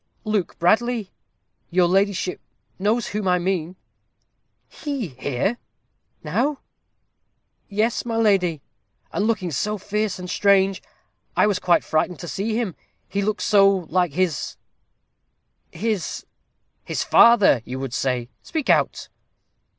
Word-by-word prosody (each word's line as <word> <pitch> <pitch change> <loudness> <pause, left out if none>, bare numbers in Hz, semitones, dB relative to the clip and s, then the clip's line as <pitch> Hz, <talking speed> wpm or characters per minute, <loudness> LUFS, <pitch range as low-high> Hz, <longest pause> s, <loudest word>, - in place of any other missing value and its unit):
"Luke 215 -5 -1
Bradley; 220 +3 +1 0.6
your 180 0 +3
ladyship 195 0 0 0.4
knows 215 +4 +1
whom 210 -1 -3
I 180 0 +4
mean." 180 -1 -2 0.9
"He 280 - -4
here 140 - -2 0.6
now? 240 - -1 0.5
" - - -51
"Yes, 215 +3 0
my 230 -1 -3
lady; 190 -9 +2 0.5
and 205 - 0
looking 200 -6 -1
so 210 +9 -1
fierce 210 +1 -2
and 180 0 -7
strange, 195 0 +3 0.6
I - - +5
was 205 -3 +1
quite 175 -1 +3
frightened 165 +3 0
to 175 - -7
see 215 +6 -2
him. 225 -7 -1 0.3
He 200 - -2
looked 210 +1 -1
so 200 -2 +5
like 180 -3 0
his 180 -4 -1 1.1
his 215 -5 -3 0.3
" - - -49
"His - - -2
father, 210 - +6
you 125 +2 -6
would 135 -3 -5
say. 125 -3 -1
Speak 315 -4 -1
out." - - +1
195 Hz, 125 wpm, -23 LUFS, 175-215 Hz, 1.1 s, father